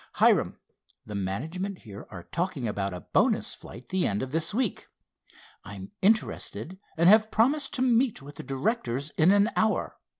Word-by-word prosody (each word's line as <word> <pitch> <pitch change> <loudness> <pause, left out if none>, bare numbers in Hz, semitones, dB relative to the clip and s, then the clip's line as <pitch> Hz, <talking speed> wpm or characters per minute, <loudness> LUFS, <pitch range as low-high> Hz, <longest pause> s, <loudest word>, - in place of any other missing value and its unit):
"Hiram, - - +3 0.5
the 105 - -8
management 160 - -4
here 100 -4 -10
are 90 -4 -9
talking 170 - -3
about 100 -2 -2
a 90 -1 -7
bonus - - +2
flight 120 +1 -12
the 185 -1 +1
end 100 +3 -1
of 130 - -6
this 165 +2 0
week. 235 -1 -2 0.8
I'm 95 -1 -9
interested 190 -3 0 0.2
and 170 +1 +4
have 215 +2 +6
promised 270 +6 +1
to 255 - +1
meet 245 -1 +2
with 145 +1 -12
the - - -7
directors 140 - -2
in 160 +3 +3
an 205 +3 +4
hour. 220 -3 0
170 Hz, 165 wpm, -27 LUFS, -, 0.8 s, have